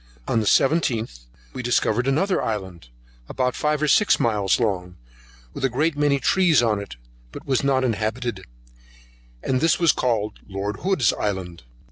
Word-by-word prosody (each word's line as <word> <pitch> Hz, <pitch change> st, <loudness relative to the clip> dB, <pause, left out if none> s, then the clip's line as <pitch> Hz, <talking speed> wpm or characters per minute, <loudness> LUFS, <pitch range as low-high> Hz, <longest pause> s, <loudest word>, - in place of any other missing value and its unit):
On 115 Hz, -, +1 dB
the 110 Hz, -, -2 dB
17th 115 Hz, -, +1 dB, 0.3 s
we -, -, -5 dB
discovered 120 Hz, 0 st, 0 dB
another 185 Hz, +8 st, +1 dB
Island, 95 Hz, -, -5 dB, 0.4 s
about 125 Hz, -1 st, -1 dB
five 150 Hz, 0 st, -1 dB
or -, -, +2 dB
six 210 Hz, +7 st, +4 dB
miles 105 Hz, -4 st, +1 dB
long, 90 Hz, -6 st, -2 dB, 0.6 s
with -, -, -7 dB
a 135 Hz, -, +3 dB
great 150 Hz, +6 st, 0 dB
many 145 Hz, -1 st, +1 dB
trees 160 Hz, -2 st, +3 dB
on 110 Hz, -3 st, +1 dB
it, 100 Hz, -11 st, -8 dB, 0.4 s
but -, -, -10 dB
was 135 Hz, -1 st, 0 dB
not 135 Hz, -1 st, +2 dB
inhabited: 115 Hz, -2 st, -2 dB, 1.0 s
this 135 Hz, +5 st, +1 dB
was 170 Hz, -4 st, +5 dB
called 110 Hz, -4 st, -2 dB
Lord 100 Hz, +1 st, -4 dB
Hood's 180 Hz, -, +1 dB
Island. 95 Hz, -4 st, -4 dB
120 Hz, 150 wpm, -23 LUFS, 105-140 Hz, 1.0 s, was